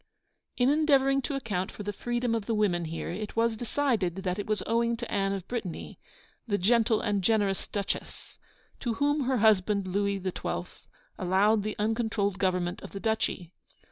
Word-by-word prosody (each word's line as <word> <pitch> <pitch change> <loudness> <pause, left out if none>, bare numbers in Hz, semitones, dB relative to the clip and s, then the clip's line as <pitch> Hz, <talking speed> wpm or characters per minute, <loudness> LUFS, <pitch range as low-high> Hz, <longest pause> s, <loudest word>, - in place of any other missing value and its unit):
In 250 +1 +4
endeavouring 275 -2 +4
to 280 +2 -3
account 200 -8 -2
for 210 - -8
the 205 0 -3
freedom 240 +2 -1
of 225 -3 -2
the 225 - +1
women 180 -5 +1
here, 160 +1 -4
it 205 +4 -5
was 230 0 +2
decided 230 -6 0
that 185 +1 -1
it 205 - -4
was 215 -1 0
owing 235 +1 +1
to 240 0 -6
Anne 195 -1 +1
of 195 -3 -4
Brittany, 220 -8 -5 0.5
the 205 -2 +1
'gentle 225 +3 +3
and 205 -3 0
generous 205 -2 +1
Duchesse,' 200 -2 -5 0.4
to 235 -3 -2
whom 290 +1 +1
her 260 0 +2
husband 205 -2 +3
Louis 200 +1 0
XII. 185 -1 -3 0.5
allowed 200 +4 +3
the 210 +1 -3
uncontrolled 210 -3 0
government 180 -2 0
of - - -10
the 200 - -4
duchy. 195 -5 -1
210 Hz, 175 wpm, -29 LUFS, 195-235 Hz, 0.5 s, In